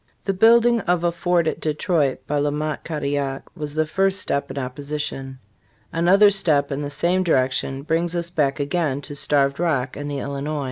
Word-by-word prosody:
The 195 - -1
building 235 +4 +5
of 180 -4 0
a 175 - +2
Fort 175 0 +1
at 160 - -2
Detroit 155 -2 0
by 145 0 -1
La 145 +1 +1
Mothe 150 +1 -2
Cadillac 140 -3 -2
was 150 -3 -6
the 155 0 +2
first 195 +4 +1
step 140 - -2
in - - -7
opposition. 135 0 -5 0.6
Another 195 +5 +5
step 150 -8 +2
in 140 +1 -2
the 145 - -3
same 175 +5 +1
direction 135 -4 0
brings 165 +3 -1
us 170 0 -2
back 145 -5 0
again 145 -1 -1
to 145 - -9
Starved 140 -1 +2
Rock 140 -7 0
and 145 0 -5
the 145 - -3
Illinois. 140 +2 -3
150 Hz, 185 wpm, -22 LUFS, 140-175 Hz, 0.6 s, building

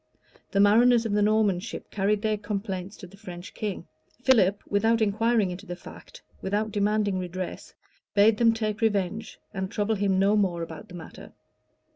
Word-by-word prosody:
The 200 - 0
mariners 230 +4 +5
of 225 - -1
the 205 0 +2
Norman 210 -3 +3
ship - - -8
carried 205 +1 0
their 215 -1 +1
complaints 200 -2 -5
to - - -10
the 190 +2 -15
French 180 -3 -9
king: 200 -5 -4 0.4
Philip, 205 -7 +3
without 225 +3 +2
inquiring 220 -1 +2
into 195 +3 -8
the 175 - -5
fact, 175 - -13 0.2
without 210 +3 -1
demanding 205 -1 +1
redress, 185 0 -6 0.4
bade 210 +1 +5
them 230 0 +5
take 215 -1 -3
revenge, 215 0 -1 0.2
and 190 -2 -3
trouble 210 +2 0
him 195 -2 +1
no 200 +2 +3
more 180 -5 +1
about 160 -2 -9
the 180 - -11
matter. 165 -2 -11
205 Hz, 170 wpm, -26 LUFS, 190-215 Hz, 0.4 s, mariners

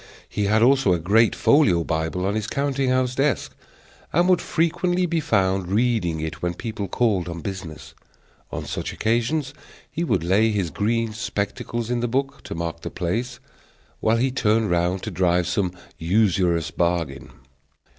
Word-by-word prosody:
He 105 - -2
had 110 +2 +3
also 130 -6 +4
a 85 - 0
great 105 +7 +3
folio 100 - +4
Bible 80 +3 -2
on 100 - 0
his 110 0 -2
counting 140 -1 0
house 130 -1 +1
desk, 135 0 0 0.6
and 175 +3 +3
would 180 -1 +4
frequently 175 +2 +1
be 170 -1 0
found 95 - +1
reading 105 -7 +1
it 80 0 -5
when 90 0 -1
people 105 -1 -4
called 100 -6 0
on 85 -1 -6
business; 90 -4 -7 0.6
on - - -4
such - - -4
occasions 120 +6 0 0.4
he 170 - -2
would 165 - 0
lay 100 +6 +3
his 100 -6 -1
green 115 +1 0
spectacles 110 +1 -3
in 120 - 0
the 120 - 0
book, 135 +3 -2
to - - -5
mark 85 0 -4
the - - -5
place, 95 +8 -3 0.6
while 110 +1 +2
he 130 +3 +1
turned 110 -4 +1
round 90 +2 0
to 110 - -4
drive 90 0 +2
some 95 -1 0 0.3
usurious 90 -3 +2
bargain. 85 -7 -1
105 Hz, 165 wpm, -23 LUFS, 90-125 Hz, 0.6 s, also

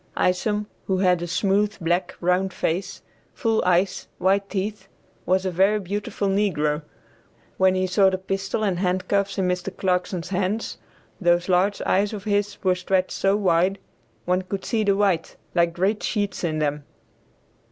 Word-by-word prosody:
Isom, 210 +3 +1 0.2
who 190 - +1
had 180 -2 +3
a 175 - -3
smooth, 200 +4 +1
black, 175 +1 0
round 180 +1 +1
face, 190 +4 -2 0.3
full 225 -4 +1
eyes, 185 +1 +1
white 195 +1 +1
teeth, 200 0 -3 0.4
was 185 +1 +2
a 185 - 0
very 195 +4 +3
beautiful 205 +2 -3
negro. 165 -7 +1 0.8
When 190 0 +4
he 185 0 +1
saw 190 +1 +4
the 190 - -1
pistol 195 +2 -2
and 190 -4 0
handcuffs 195 +2 0
in 190 -2 +1
Mr. 180 +1 -1
Clarkson's 180 -2 -1
hands, 195 +3 -2 0.4
those 175 0 +3
large 190 +2 +2
eyes 200 +3 +1
of 205 -2 -6
his 205 -1 0
were 185 -1 +4
stretched 185 0 0
so 195 +1 +1
wide, 185 -1 +2 0.5
one 180 +1 +1
could 190 +1 -5
see 225 -3 0
the 200 -1 +2
white, 190 -5 +1 0.2
like 170 0 +3
great 190 +5 0
sheets 205 -4 -2
in 160 -3 0
them. 150 -1 -1
190 Hz, 160 wpm, -24 LUFS, 180-200 Hz, 0.8 s, When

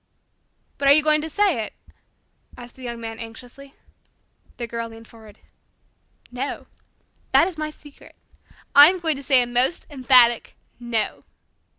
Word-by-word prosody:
'" - - -46
"But 280 - 0
are 280 - +8
you 305 +1 +4
going 305 0 +2
to 320 - -6
say 370 - 0
it?" - - -9 0.8
asked 245 0 -12
the 260 - -17
Young 235 -2 -7
Man 225 -1 -8
anxiously. 245 +4 -12 0.8
The 240 - -4
Girl 230 0 -6
leaned 225 0 -14
forward. 220 -2 -17 0.9
"No. 255 +3 -6 0.7
That 335 - +5
is 375 - -6
my 305 0 -3
secret. 295 -1 -17 0.6
I 290 +2 +9
am 370 0 -3
going 320 -4 -2
to - - -8
say 265 -3 +3
a - - -4
most 245 +6 -1
emphatic 250 -3 +4 0.2
'no.'" 235 -3 -3
255 Hz, 160 wpm, -22 LUFS, 235-295 Hz, 0.9 s, I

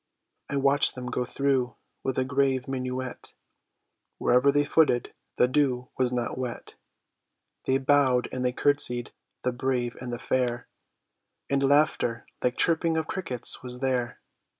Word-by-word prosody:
I - - -2
watched 140 +1 +3
them 125 -1 -6
go 125 - 0
through 130 -1 0 0.3
with 130 - -2
a 130 - +1
grave 135 -1 +1
minuet; 130 -1 -4 0.8
Wherever 125 +3 +4
they 145 +1 +2
footed 145 -5 +2 0.2
the 125 - +5
dew 130 -2 0
was 125 -1 +1
not 125 0 -2
wet; 125 -2 -5 0.9
They 130 - +3
bowed 135 -2 +3
and 130 - -3
they 125 - +2
curtsied, 125 -3 +1 0.3
the 125 - +1
brave 125 -1 -1
and 125 -1 -5
the 120 - -3
fair; 120 -1 -1 0.8
And 140 0 +2
laughter 140 -4 +2 0.2
like 125 0 0
chirping 165 -1 +2
of 160 - 0
crickets 160 - 0
was 125 -1 -4
there. 125 -3 -1
130 Hz, 145 wpm, -27 LUFS, 125-140 Hz, 0.9 s, the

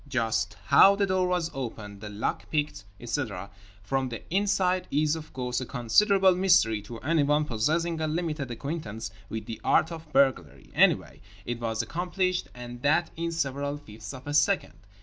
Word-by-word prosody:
Just 110 -6 -1
how 200 +1 +7
the 200 0 +2
door 185 -1 +1
was 180 -2 0
opened, 110 -6 -6
the 105 - -6
lock 105 +2 -3
picked, 150 -10 -2
etc., 110 -7 -4 0.3
from 135 +4 -1
the 115 - -7
inside 185 -2 +1
is 150 +2 +2
(of 160 -1 -8
course) 125 -1 -2
a - - -3
considerable 190 - +4
mystery 175 - +3
to 115 +3 -9
anyone 150 0 +2
possessing 160 +8 0
a 155 - 0
limited 155 -4 -2
acquaintance 115 -5 -5 0.2
with 110 0 -5
the 115 - -7
art 160 - +3
of 160 -2 -9
burglary. 110 - +1
Anyway - - +3 0.2
it 120 -1 -3
was 110 -1 -1
accomplished, 180 +4 -1
and 120 0 -8
that 155 +4 +2
in 170 +1 -2
several 140 -2 -2
fifths 110 -7 -10
of 130 0 -10
a 145 - -4
second. 150 +7 +2
145 Hz, 170 wpm, -27 LUFS, 115-170 Hz, 0.3 s, how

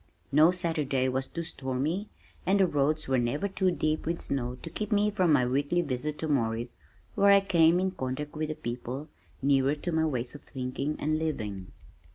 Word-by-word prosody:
No 155 +4 +6
Saturday 160 -7 0
was 130 +1 -1
too 170 - -5
stormy, 155 +6 -2 0.3
and 195 +2 +2
the 190 - +6
roads 150 -1 0
were 130 -1 +2
never 135 +11 0
too 190 -1 +1
deep 155 -3 -1
with 170 0 -1
snow 125 -2 -2
to 165 - -5
keep 210 +5 -4
me 210 0 +3
from 185 -5 +2
my 135 -4 +4
weekly 145 +7 +1
visit 145 +1 -3
to 160 - -3
Morris 115 -5 -1 0.4
where 200 -1 +4
I 200 0 +8
came 175 -3 +4
in 190 0 0
contact 145 -2 -4
with 155 0 -4
people 125 +5 -5 0.3
nearer 135 +1 +3
to 175 +4 -4
my 160 -1 +2
ways 125 -4 -3
of 145 - -10
thinking 135 +3 -4
and 155 +1 0
living. 105 -12 -3
150 Hz, 190 wpm, -29 LUFS, 130-170 Hz, 0.4 s, I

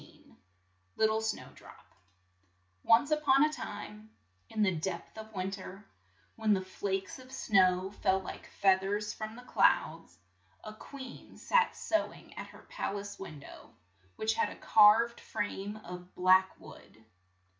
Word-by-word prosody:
65 - - -20 0.6
LITTLE 220 0 +2
SNOWDROP 220 -1 -6 1.0
ONCE 235 - +4
on 290 -2 +4
a 305 - -1
time 210 -5 -8 0.4
in 215 - 0
the 195 - +3
depth 170 +1 -4
of 220 0 -9
win 190 -2 -3
ter, 195 +1 -9 0.5
when 215 -2 +2
the 190 - -2
flakes 195 +3 -3
of 255 0 -14
snow 190 -6 +2
fell 190 -2 +1
like 190 - -8
fea 190 -1 +3
thers 205 +2 -2
from 215 0 -6
the 245 - -11
clouds, - - +1 0.5
a 215 - -8
queen 260 +3 -11
sat - - +2
sew 325 - 0
ing - - -15
at - - -7
her - - -16
pal 355 - -3
ace 200 0 -8
win 155 -7 -8
dow, - - -13 0.5
which 220 0 0
had - - +1
a - - -9
carved 225 +2 +5
frame 205 0 -4
of 180 0 -10
black 185 +1 +4
wood. 105 +2 -15
205 Hz, 150 wpm, -31 LUFS, 190-220 Hz, 1.0 s, carved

